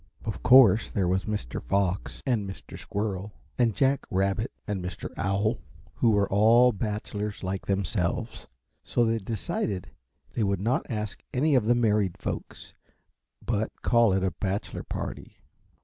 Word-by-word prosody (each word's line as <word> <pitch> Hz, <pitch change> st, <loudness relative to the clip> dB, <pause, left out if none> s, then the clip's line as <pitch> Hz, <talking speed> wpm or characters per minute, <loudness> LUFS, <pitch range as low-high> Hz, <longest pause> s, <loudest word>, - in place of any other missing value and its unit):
Of 110 Hz, -, -4 dB
course 125 Hz, -4 st, +7 dB
there 95 Hz, -4 st, 0 dB
was 95 Hz, +1 st, 0 dB
Mr. 105 Hz, -, -3 dB
Fox 95 Hz, +7 st, -1 dB
and 110 Hz, -7 st, 0 dB
Mr. 95 Hz, -, -9 dB
Squirrel 100 Hz, -1 st, -4 dB, 0.3 s
and 115 Hz, -4 st, +3 dB
Jack 135 Hz, 0 st, +1 dB
Rabbit 100 Hz, +6 st, 0 dB, 0.2 s
and 100 Hz, -4 st, -2 dB
Mr. 90 Hz, 0 st, -6 dB
Owl, 100 Hz, +5 st, 0 dB, 0.3 s
who 115 Hz, -, +2 dB
were 100 Hz, -2 st, +3 dB
all 115 Hz, +5 st, +5 dB
bachelors 105 Hz, -1 st, -4 dB
like 95 Hz, +1 st, -3 dB
themselves; 95 Hz, -2 st, -1 dB, 0.4 s
so 120 Hz, -, +1 dB
they 115 Hz, 0 st, +1 dB
decided 100 Hz, -2 st, -3 dB, 0.4 s
they -, -, -2 dB
would 100 Hz, -2 st, 0 dB
not 115 Hz, +7 st, 0 dB
ask 105 Hz, -3 st, -4 dB
any 150 Hz, +4 st, +3 dB
of 125 Hz, -5 st, +3 dB
the 120 Hz, +2 st, +4 dB
married 105 Hz, -6 st, +1 dB
folks, -, -, -6 dB, 0.7 s
but 110 Hz, -1 st, 0 dB
call 120 Hz, -3 st, +4 dB
it 95 Hz, 0 st, +1 dB
a 95 Hz, -, +1 dB
bachelor 95 Hz, +5 st, -3 dB
party. -, -, -6 dB
105 Hz, 150 wpm, -27 LUFS, 95-115 Hz, 0.7 s, course